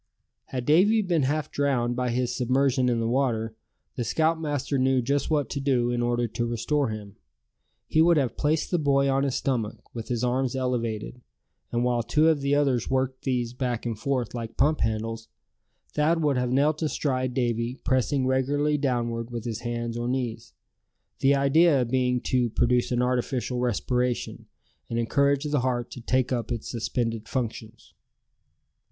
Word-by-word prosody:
Had 125 -2 -5
Davy 205 +8 +4
been 175 -5 +1
half 145 +3 -1
drowned 125 -4 0
by 125 0 -1
his 125 +1 -1
submersion 130 0 +2
in 120 -1 +1
the 115 - 0
water, 115 -3 0 0.4
the 120 - -2
scoutmaster 150 0 0
knew 130 0 +3
just 140 +3 0
what 150 -3 +1
to 140 - -2
do 130 -3 +1
in 120 0 -1
order 120 0 +1
to 120 +2 -2
restore 120 +4 0
him. 105 -2 -7 0.7
He 160 - +3
would 170 0 +5
have 130 -5 0
placed 150 +1 0
the 175 - +2
boy 140 -2 +2
on 135 0 +2
his 135 -2 0
stomach, 115 -6 -1 0.2
with 115 -2 -6
his 120 -1 -2
arms 125 +1 0
elevated; 125 -2 -2 0.5
and 120 0 0
while 120 -1 +1
two 150 +7 +3
of 155 -3 +1
the 140 +1 +2
others 135 -5 +1
worked 130 0 -1
these 125 -3 -1
back 125 -2 -2
and 115 -2 -2
forth 125 +1 -2
like 115 -2 -6
pump 150 +3 +3
handles, 110 +1 -2 0.7
Thad 160 +2 +2
would 145 -2 +2
have 125 -1 0
knelt 145 +4 +2
astride 130 -5 -1
Davy, 120 -1 0
pressing 130 +1 +1
regularly 145 +3 +1
downward 120 -4 -1
with 120 -1 -6
his 115 -2 -3
hands 120 -1 -3
or 120 - -2
knees; 120 -3 -3 0.7
the 140 +1 +4
idea 140 0 +4
being 125 0 +1
to 125 -2 +1
produce 120 +3 +1
an 125 0 +1
artificial 125 0 -1
respiration, 125 +1 -1 0.4
and 115 - -2
encourage 140 +4 +2
the 150 -1 0
heart 125 -1 -1
to 125 - -8
take 130 +2 0
up 120 -1 -2
its 115 -2 -4
suspended 115 -1 -2
functions. 115 -3 -5
125 Hz, 170 wpm, -26 LUFS, 120-140 Hz, 0.7 s, would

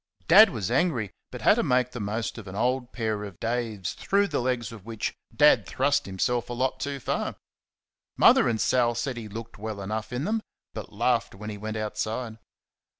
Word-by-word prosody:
Dad 200 +7 +9
was 110 - -3
angry, 125 - +1 0.2
but - - -8
had - - +6
to - - +3
make 125 0 +2
the 125 - -6
most 110 +3 -3
of 105 - -11
an 95 - -7
old 125 +3 0
pair 110 -3 -2
of 100 -4 -9
Dave's 115 -5 -2
through 200 0 +1
the 150 - 0
legs 125 -2 -1
of 110 -4 -11
which 115 0 -3 0.2
Dad - - +5
thrust - - +1
himself 115 +6 -1
a - - -3
lot 130 +1 -1
too 140 +1 -3
far. - - -2 0.8
Mother - - +6
and 110 -2 -1
Sal 120 -1 +2
said 130 +2 -2
he 115 -2 -6
looked 110 0 -8
well 110 -1 -5
enough 110 +4 -4
in 125 +3 -2
them, 220 +5 0 0.3
but 110 - -7
laughed 115 0 0
when 105 +2 -6
he 105 - -6
went 110 +1 -4
outside. 110 +2 -3
115 Hz, 200 wpm, -27 LUFS, 105-125 Hz, 0.8 s, Dad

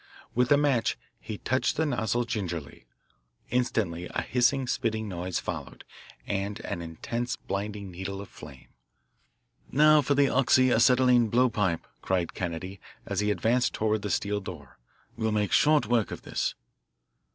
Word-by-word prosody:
With 125 +2 +1
a 145 - +7
match 140 -5 +1 0.2
he 105 - -6
touched 130 +5 0
the 160 - +2
nozzle 120 -3 0
gingerly. 85 -10 -5 0.6
Instantly 100 -9 0
a - - -2
hissing, 130 +2 +2
spitting 110 -2 -1
noise 90 -1 -3
followed, - - -6 0.4
and 100 +2 -2
an 85 - -4
intense 115 +9 -4
blinding 100 0 -5
needle 95 +2 -5
of 100 - -7
flame. 70 -3 -13 1.0
"Now 150 +2 +6
for 140 +1 +1
the 140 0 +4
oxy 130 -1 +4
acetylene 125 0 +5
blowpipe," 105 -8 +1 0.2
cried 90 -3 -1
Kennedy 90 +2 -5 0.2
as 100 -2 -2
he 105 0 +1
advanced 120 +4 +1
toward 110 -1 0
the 105 - -4
steel 105 +1 0
door. 85 -11 -10 0.4
"We'll 110 0 -1
make 105 -1 0
short 150 -4 +4
work 115 -1 +1
of - - -7
this." - - -2
110 Hz, 145 wpm, -28 LUFS, 95-125 Hz, 1.0 s, a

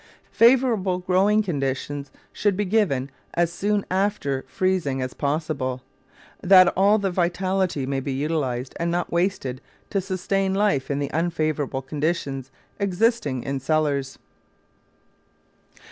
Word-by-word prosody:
Favourable 230 -6 +4
growing 190 +4 +2
conditions 140 -4 -3 0.2
should 205 -3 0
be 205 - 0
given 180 -11 +1 0.2
as 170 0 +1
soon 205 +2 0
after 185 -9 0
freezing 185 -8 0
as 130 -1 -3
possible, 140 -4 -2 0.6
that 185 -1 +7
all 200 +3 +3
the 195 -2 -1
vitality 180 -3 0
may 135 0 -1
be 135 +1 -4
utilised 135 -3 -2
and 170 0 0
not 175 0 -1
wasted 170 -8 -1 0.3
to 195 - +1
sustain 190 +1 -1
life 200 -10 +1
in 140 - 0
the 140 -1 -2
unfavourable 155 -5 -1
conditions 140 -2 -2 0.3
existing 200 - 0
in 140 0 -2
cellars. 140 -1 0
170 Hz, 120 wpm, -24 LUFS, 140-195 Hz, 0.6 s, that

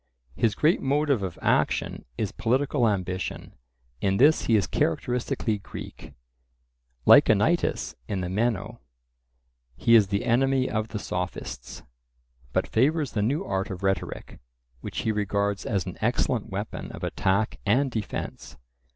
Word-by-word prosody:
His 110 +2 +1
great 155 +4 +3
motive 140 -3 +1
of 95 -4 -4
action - - +1
is 105 - -1
political 130 0 +1
ambition; 95 -2 -3 0.5
in 95 0 +1
this 150 +7 +5
he 115 - +3
is 100 -4 +3
characteristically 110 +3 -1
Greek. - - -10 0.9
Like - - +8
Anytus - - +2
in 95 -2 -2
the 90 - -2
Meno, 110 +3 -1 0.9
he 115 - +2
is 110 -4 +7
the 100 +3 -1
enemy 130 +2 +2
of 110 -1 -1
the 110 - -5
Sophists; 90 -11 -5 0.7
but - - +1
favours 145 +4 +1
the 105 - -1
new 140 - 0
art 95 0 -2
of 95 0 -6
rhetoric, 95 -3 -2 0.4
which - - -5
he 110 - 0
regards 100 -1 -1
as 100 -4 0
an - - -7
excellent - - 0
weapon - - -5
of - - -9
attack 100 +3 0
and 130 +6 +2
defence. 110 -3 -5
110 Hz, 140 wpm, -26 LUFS, 95-125 Hz, 0.9 s, Like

